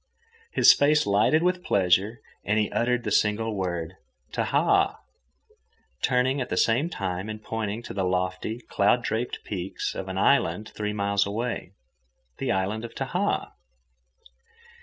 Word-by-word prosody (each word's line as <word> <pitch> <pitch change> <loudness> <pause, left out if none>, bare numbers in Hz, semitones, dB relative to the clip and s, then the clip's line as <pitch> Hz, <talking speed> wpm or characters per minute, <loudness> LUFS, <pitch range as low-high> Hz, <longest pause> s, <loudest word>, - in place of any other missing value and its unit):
His - - +7
face 150 +1 +3
lighted 105 +11 +3
with 180 0 +1
pleasure 95 +4 +2 0.2
and 105 +1 +1
he 105 -1 +1
uttered 120 0 0
the 105 - -3
single 110 +2 +1
word, 90 -2 -3 0.4
"Tahaa," - - +2 1.1
turning 130 +2 +2
at 125 - -4
the - - -2
same 125 +9 +2
time 95 - -4
and 110 0 -5
pointing 110 0 -4
to - - -7
the 95 - -1
lofty, 90 +5 -2
cloud 110 +2 +2
draped 115 +2 -3
peaks 95 -1 -4
of - - -6
an - - -4
island 90 +6 +2
three 105 -1 -4
miles 100 -1 +1
away—the 65 - -6
island 95 +4 -1
of 120 - -8
Tahaa. - - -1
105 Hz, 140 wpm, -26 LUFS, 95-120 Hz, 1.1 s, His